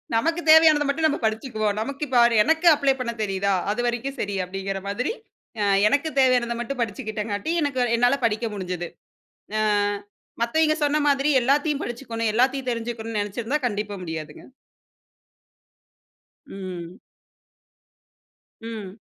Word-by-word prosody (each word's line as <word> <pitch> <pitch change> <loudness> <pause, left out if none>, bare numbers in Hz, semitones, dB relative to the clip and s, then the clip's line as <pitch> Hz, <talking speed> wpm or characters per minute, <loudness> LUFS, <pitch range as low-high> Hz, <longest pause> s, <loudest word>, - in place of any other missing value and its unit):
நமக்குத் 330 +8 0
தேவையானத 315 -2 +7
மட்டும் 315 +3 +2
நம்ப 295 - -1
படிச்சிக்குவோம். 220 -2 -1
நமக்கு 280 +6 -4
இப்போ 250 -2 +4 0.2
எனக்கு 320 +5 +2
அப்ள 280 -2 +2
பண்ணத் 235 -2 -4
தெரியுதா? 195 0 0 0.2
அது 240 - -1
வரைக்கும் 245 +3 -2
சரி 200 -1 -2
அப்படிங்கிற 195 +1 -4
மாதிரி, 235 - -1 0.5
அ - - +2 0.2
எனக்கு 285 +6 +1
தேவையானத 245 -2 +2
மட்டும் 245 +1 -4
படிச்சிகிட்டேன் 215 -2 -4
காட்டி, 205 +12 -2
எனக்கு 285 -3 -1 0.2
என்னால 245 +4 +3
படிக்க 225 +1 0
முடிஞ்சது. 180 -3 -4 0.7
ஆ - - +1 0.8
மத்தவய்ங்க 310 +6 +2
சொன்ன 295 +1 +2
மாதிரி 280 +1 +2
எல்லாத்தையும் 285 +3 +1
படிச்சிக்கணும். 230 -2 -3
எல்லாத்தையும் 260 +1 +1
தெரிஞ்சுக்கணும்னு 230 -1 -4
நெனைச்சிருந்தா, 225 +8 -2
கண்டிப்பா 205 -2 -3
முடியாதுங்க. 160 -2 -7 2.1
ம். 185 -2 -8 1.6
ம். 220 -3 -7
235 Hz, 120 wpm, -24 LUFS, 205-280 Hz, 2.1 s, தேவையானத